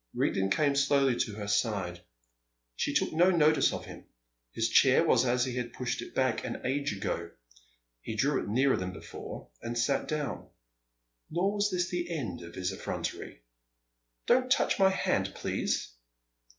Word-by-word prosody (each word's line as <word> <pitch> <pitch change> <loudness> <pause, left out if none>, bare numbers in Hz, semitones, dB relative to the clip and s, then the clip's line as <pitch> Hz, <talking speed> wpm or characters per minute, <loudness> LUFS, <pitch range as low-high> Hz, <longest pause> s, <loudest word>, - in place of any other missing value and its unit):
Rigden 95 0 +1
came 140 +7 +2
slowly 140 -2 +3
to 105 - -1
her 105 -1 -5
side. 100 -5 -1 0.7
She - - -1
took - - +1
no 175 +3 +5
notice 155 -3 +4
of - - -5
him. - - -11 0.5
His - - 0
chair - - +5
was 125 +2 +3
as 125 +1 +2
he 125 -2 -4
had 120 -1 -3
pushed 125 -1 -3
it - - -10
back 130 -4 +1
an - - -5
age 140 +3 0
ago; 85 -4 -3 0.7
he 110 - -5
drew 140 +7 +1
it - - -6
nearer 130 +5 +3
than 90 0 -4
before, - - -9
and 120 +1 -4
sat 135 +4 +1
down. 150 -2 -3 0.8
Nor 185 +5 0
was 205 0 +1
this 180 -2 -1
the 175 -1 -3
end 140 - -4
of 85 0 -10
his 90 0 -2
effrontery. 80 -9 -5 0.8
"Don't 255 +1 +3
touch 275 - +2
my 190 -1 +6
hand, 190 - 0
please!" - - -2
130 Hz, 165 wpm, -30 LUFS, 105-155 Hz, 0.8 s, my